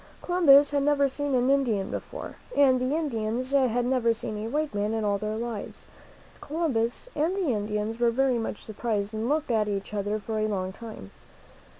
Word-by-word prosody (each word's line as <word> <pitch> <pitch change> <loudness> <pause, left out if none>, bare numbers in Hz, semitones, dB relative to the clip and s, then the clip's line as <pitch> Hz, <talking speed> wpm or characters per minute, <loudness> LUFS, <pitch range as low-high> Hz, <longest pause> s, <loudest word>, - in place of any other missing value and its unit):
Columbus 290 -6 +6
had 285 -1 +1
never 280 0 +3
seen 285 0 -2
an 250 +2 +3
Indian 235 -9 +1
before, - - -6 0.2
and 260 -3 +5
the 255 +4 0
Indians 250 -4 -2
had 250 -3 +2
never 245 -3 +2
seen 215 -1 -4
a 220 +2 -4
white 300 +3 -1
man 205 +2 -1
in 220 - -1
all 200 -1 +1
their 215 +1 -3
lives. 230 -2 -5
So - - -11
both - - -24
Columbus 280 - -1
and 320 +5 +1
the 375 -6 0
Indians 210 +1 -2
were 240 -1 +4
very 255 0 +2
much 225 - -5
surprised 215 -1 -2
and 220 +3 -2
looked 300 -2 0
at 215 -2 +2
each 200 0 -3
other 205 +1 -1
for 215 +1 -4
a 215 - +1
long 190 -3 -2
time. 220 - -10
235 Hz, 200 wpm, -27 LUFS, 215-280 Hz, 0.2 s, Columbus